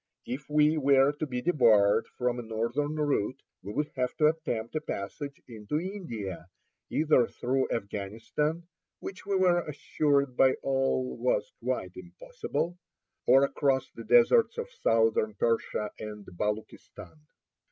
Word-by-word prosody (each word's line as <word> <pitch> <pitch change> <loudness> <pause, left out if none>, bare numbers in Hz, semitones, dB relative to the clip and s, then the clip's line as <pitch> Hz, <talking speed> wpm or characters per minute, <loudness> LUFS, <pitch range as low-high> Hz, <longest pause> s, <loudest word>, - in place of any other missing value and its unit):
If 135 +3 -6
we 150 +1 +3
were 140 0 +5
to 150 +1 -4
be 125 -2 -4
debarred 110 -9 +4
from 125 -1 0
a - - -2
northern 115 +7 -2
route, 140 -5 0 0.2
we 100 - -7
would 150 +7 -2
have 125 -1 -2
to 150 -1 +5
attempt 155 -7 -3
a 155 - 0
passage 140 +4 -6
into 115 +5 -3
India 115 - -6 0.4
either 150 -6 +3
through 130 +2 -1
Afghanistan, 115 +10 -3 0.4
which 190 - -8
we 200 - +1
were 180 -2 +4
assured 140 -2 0
by 130 +1 +5
all 135 -1 0
was - - 0
quite - - -2
impossible, - - -5 0.5
or 135 +3 +7
across 140 -1 +1
the - - -9
deserts 480 -1 +4
of 475 +1 -4
southern 110 - +1
Persia 110 -1 0
and 105 -1 -7
Baluchistan. 105 -4 -5
135 Hz, 135 wpm, -29 LUFS, 110-155 Hz, 0.5 s, or